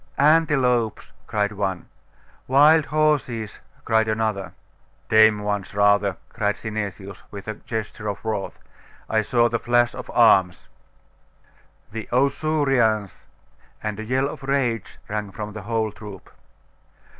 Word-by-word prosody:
'Antelopes!' 135 -7 +2 0.2
cried 105 -1 0
one. 95 -3 -3 0.6
'Wild 150 +4 +5
horses!' 140 -8 0 0.3
cried 110 -1 +2
another. 110 -4 -1 0.6
'Tame 110 -1 +5
ones, 105 -1 -3
rather!' 100 -2 +3
cried 105 -3 -1
Synesius, 100 -3 -6
with 100 0 -9
a 110 - -2
gesture 110 0 -6
of 100 - -3
wrath. 110 -3 -3 0.5
'I 110 - +3
saw 120 +2 +2
the 115 0 -1
flash 120 0 +2
of - - -8
arms!' 95 -6 +3 1.2
'The 110 0 -7
Ausurians!' 135 -6 +1 0.6
And 105 -1 -3
a - - -4
yell 130 +4 0
of 145 - -8
rage 135 -6 -1
rang 105 -1 -3
from 105 +2 -6
the 110 - -7
whole 110 -2 0
troop. 105 -2 -11
110 Hz, 120 wpm, -23 LUFS, 105-125 Hz, 1.2 s, Wild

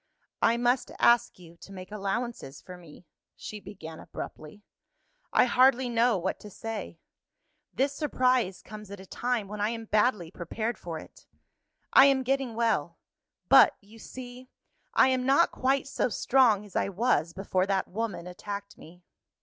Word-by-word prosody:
"I 230 +1 +3
must 245 +1 +1
ask 235 -1 +3
you 170 -2 -15
to 195 - -14
make 185 0 -10
allowances 210 - -4
for 185 - -11
me," 175 -1 -15 0.3
she 215 - -8
began, 165 -6 -10
abruptly; 155 +7 -9 0.7
"I - - +5
hardly 255 0 +4
know 235 -1 +2
what 185 +2 -3
to 210 - -11
say. 205 -3 -6 0.7
This 275 +2 0
surprise 255 - 0
comes 210 -1 -10
at 200 -1 -9
a 190 - -11
time 240 +1 -2
when 210 +1 -6
I 210 - +1
am 225 -1 -5
badly 210 -6 +1
prepared 220 +7 -4
for 165 -2 -6
it. - - -14 0.7
I 270 - +9
am 270 -1 +2
getting 265 -2 -1
well; 210 -9 0 0.5
but, - - +7
you 215 +3 -17
see, 250 +1 -10 0.5
I - - +6
am 255 -1 +1
not 275 +6 +4
quite 265 +2 0
so 275 - -1
strong 230 -4 +3
as 200 - -16
I - - +1
was 190 -6 +1
before 185 +1 -1
that 195 -1 0
woman 195 -4 -4
attacked 200 +3 -7
me. 175 +3 -15
215 Hz, 160 wpm, -28 LUFS, 185-250 Hz, 0.7 s, I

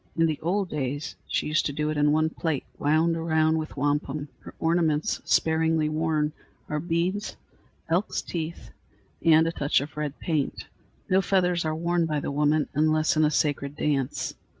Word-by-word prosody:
In 165 - +4
the 155 -2 -1
old 185 +3 0
days 145 0 -3
she - - -1
used 155 +1 +1
to 145 - -4
do 150 +1 -1
it - - -3
in 150 0 +3
one 155 +1 +2
plait 160 -5 -2 0.2
wound 160 +3 +2
around 160 -1 +2
with 155 -2 -6
wampum. 145 +1 -1
Her - - -12
ornaments, 160 -2 +1
sparingly 160 -1 +2
worn, 155 -1 0 0.3
are 150 - -2
beads, 175 +5 -1 0.5
elks' 175 +5 0
teeth, 165 -1 -5 0.5
and 160 0 +6
a 165 - 0
touch 145 -3 +1
of 140 0 -7
red 150 -1 -3
paint. 155 -5 -2 0.4
No 190 +1 +3
feathers 180 -3 +1
are 155 0 0
worn 170 +1 +1
by 150 -2 0
the 140 - -3
woman, 150 +1 +2
unless 155 +2 +2
in 155 - +3
a 150 - +4
sacred 145 -1 0
dance. 140 -4 -1
155 Hz, 175 wpm, -26 LUFS, 150-165 Hz, 0.5 s, and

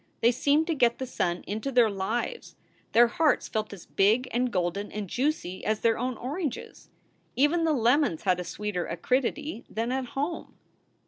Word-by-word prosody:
They 235 - +5
seemed 290 +5 +2
to 335 - 0
get 240 -5 +2
the 260 - -3
sun 175 -8 -2
into 220 +7 -3
their 245 -3 +5
lives. 220 - -3 0.4
Their 240 +1 +7
hearts 300 +6 +1
felt 215 -1 -3
as 200 -4 -10
big 220 +6 +2
and 245 +1 0
golden 185 +2 -1
and 210 -2 -4
juicy 245 - -2
as 215 0 0
their 230 -1 +3
own 250 +1 -2
oranges. 290 +1 -5 0.5
Even 315 +5 +3
the 320 - +3
lemons 245 - +2
had 180 -2 +2
a - - -2
sweeter 180 +1 -3
acridity 255 - -1
than 230 +2 -2
at 260 0 -1
home. 300 +5 -3
240 Hz, 175 wpm, -27 LUFS, 205-275 Hz, 0.5 s, Their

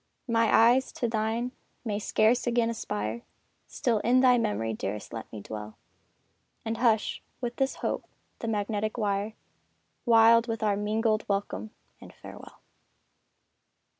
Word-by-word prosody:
My 230 -1 +2
eyes 245 +4 +5
to 240 - -1
thine 225 +2 -1 0.3
may 210 -2 -1
scarce 220 +4 +2
again 235 -1 +2
aspire 110 - -4 0.5
Still 230 -4 0
in 245 +4 +3
thy 250 -2 +5
memory, 110 - -1
dearest 105 -1 -5
let 115 - -7
me 110 - -7
dwell, 105 +1 -8 0.9
And 225 0 -2
hush, 225 -3 +1 0.2
with 240 -1 -4
this 270 -1 0
hope, - - -2 0.3
the 230 - -4
magnetic 215 0 -1
wire, 205 0 -1 0.7
Wild 230 0 +6
with 225 -1 -3
our 205 -2 +2
mingled 215 +1 0
welcome 200 +2 -2 0.3
and - - -12
farewell! - - -12
220 Hz, 135 wpm, -28 LUFS, 205-235 Hz, 0.9 s, Wild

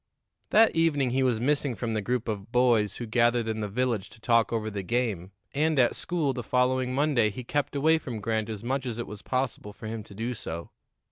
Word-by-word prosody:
That 225 +1 +5
evening 145 -6 +2
he 130 +2 +1
was 125 -4 +2
missing 140 0 +1
from 115 -1 -3
the 110 - 0
group 120 +2 -1
of 105 0 -4
boys 120 -4 +3
who 120 - -5
gathered 120 +1 +2
in 110 -1 -2
the 105 - -1
village 115 -1 -1
to 110 - -16
talk 115 0 +3
over 110 -2 -1
the 100 -1 -3
game, 100 -4 -1 0.2
and 155 +2 +1
at 125 -2 +4
school 160 -6 0
the 125 - -4
following 125 +1 +1
Monday 135 -6 +3
he 115 +5 -7
kept 145 +4 -2
away 160 +3 +4
from 120 -7 -6
Grant 110 +1 -1
as 110 -1 -5
much 130 +2 -1
as 115 -2 -3
it 120 - -3
was 105 -1 -9
possible 130 -5 -2
for 110 - -11
him 110 0 -4
to 100 - -13
do 115 +4 -2
so. 85 -6 -6
120 Hz, 225 wpm, -27 LUFS, 110-130 Hz, 0.2 s, That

